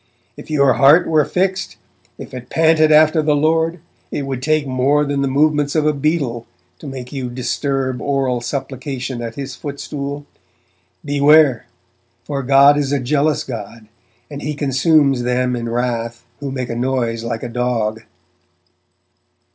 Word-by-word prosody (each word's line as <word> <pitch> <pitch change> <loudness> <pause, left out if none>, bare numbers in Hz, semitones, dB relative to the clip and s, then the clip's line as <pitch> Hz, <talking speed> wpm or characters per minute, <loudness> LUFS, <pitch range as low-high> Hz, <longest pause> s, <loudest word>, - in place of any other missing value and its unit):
'If - - -12
your 140 -4 +3
heart 140 +8 +5
were 155 -2 +3
fixed, 190 +1 -2 0.4
if - - -10
it 125 -1 -8
panted 160 -1 +3
after 155 +1 +5
the 150 -1 +2
Lord, 160 +3 +1 0.3
it 145 - -3
would 135 -2 -4
take 155 +1 +1
more 135 +3 +1
than 140 -1 -1
the 140 - +1
movements 145 +1 +1
of 155 -1 +2
a 155 - +3
beetle 140 -5 -1 0.3
to - - -10
make 130 -1 -8
you 130 -3 -4
disturb 130 +1 -2
oral 135 -3 -1
supplication 130 -1 -5
at 115 -1 -6
His 135 -2 -6
footstool. 140 0 -6 0.8
Beware! 145 -3 +4 0.6
for 140 -2 -3
God 140 +2 +5
is 140 -2 -1
a 140 - +1
jealous 145 +3 0
God 115 -2 -8 0.4
and 145 -1 -8
He 150 0 -3
consumes 140 -1 +2
them 125 +1 0
in 120 -1 -4
wrath 115 -1 -3
who 140 -1 -5
make 130 -2 -4
a - - -3
noise 120 -2 -1
like 115 -1 -4
a - - -3
dog.' 115 -2 -2
140 Hz, 155 wpm, -18 LUFS, 125-150 Hz, 0.8 s, heart